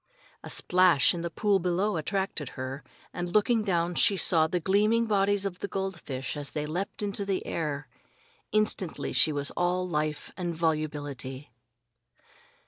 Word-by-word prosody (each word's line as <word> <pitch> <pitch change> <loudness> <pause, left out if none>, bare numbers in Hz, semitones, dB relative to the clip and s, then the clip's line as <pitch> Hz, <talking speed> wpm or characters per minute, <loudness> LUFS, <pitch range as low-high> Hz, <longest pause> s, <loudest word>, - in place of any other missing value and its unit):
A - - -8
splash 180 -7 +4
in 170 - -4
the 170 - -2
pool 200 +2 +2
below 185 +4 0
attracted 165 -3 -2
her, 130 +2 -5 0.3
and 175 0 -4
looking 215 +3 +3
down 175 -3 0
she 200 +3 +4
saw 160 -3 +4
the 180 +2 -1
gleaming 210 +6 +3
bodies 200 -2 +2
of 180 -2 -4
the - - -3
goldfish 170 -10 -4
as 145 -2 -5
they 150 -1 -2
leaped 180 +7 -3
into 200 0 -2
the 195 -1 -2
air. 145 -4 -3 0.6
Instantly 215 -5 0
she 155 - +5
was 145 -1 -3
all 180 +1 0
life 155 -3 -2
and 175 -2 -3
volubility. 145 -5 -3
175 Hz, 150 wpm, -28 LUFS, 150-195 Hz, 0.6 s, she